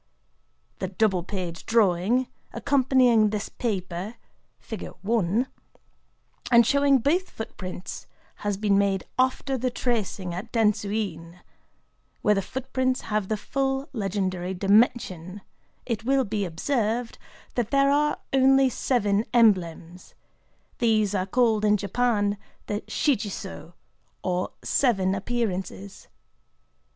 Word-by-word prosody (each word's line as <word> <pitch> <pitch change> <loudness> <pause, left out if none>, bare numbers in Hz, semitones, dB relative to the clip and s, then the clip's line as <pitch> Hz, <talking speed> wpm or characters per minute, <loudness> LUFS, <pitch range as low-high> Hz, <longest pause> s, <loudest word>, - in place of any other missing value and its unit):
The 190 - -2
double 190 -1 +1
page 180 -2 -5
drawing, 225 +2 +2 0.3
accompanying 255 -5 +3
this 210 0 -3
paper, 190 -1 -3 0.9
and 225 +1 +2 1.2
showing 280 +2 +4
both 320 +9 +1
footprints, 185 -4 -7 0.3
has 205 -1 -2
been 200 -1 +2
made 195 -2 +1 0.2
after 260 +1 +1
the 255 +2 0
tracing 215 -7 -2
at 195 +7 -6
Dentsu 215 -3 +1
In, 175 -5 -4 0.8
where 210 - +5
the 195 - +1
footprints 260 +3 -2
have 215 -3 -2
the 215 - -1
full 270 +5 -2
legendary 190 -4 -2
dimension, 195 -2 +1 0.4
It 230 -2 -3
will 270 +2 +2
be 205 -1 -2
observed 230 - -1 0.3
that 235 -3 -1
there 275 0 +3
are 295 +1 +2 0.2
only 270 0 +5
seven 210 -5 +1
emblems: 180 -6 +1 0.6
these 215 -4 +2
are 190 -1 -1
called 225 -1 +2
in 210 0 +4
Japan 205 0 0 0.3
the 205 +1 -3
Shichi 240 -8 +1
Sō, 190 -3 -8 0.5
or 180 0 -1
"Seven 195 -8 +2
Appearances." 195 -2 -3
215 Hz, 110 wpm, -25 LUFS, 190-245 Hz, 1.2 s, where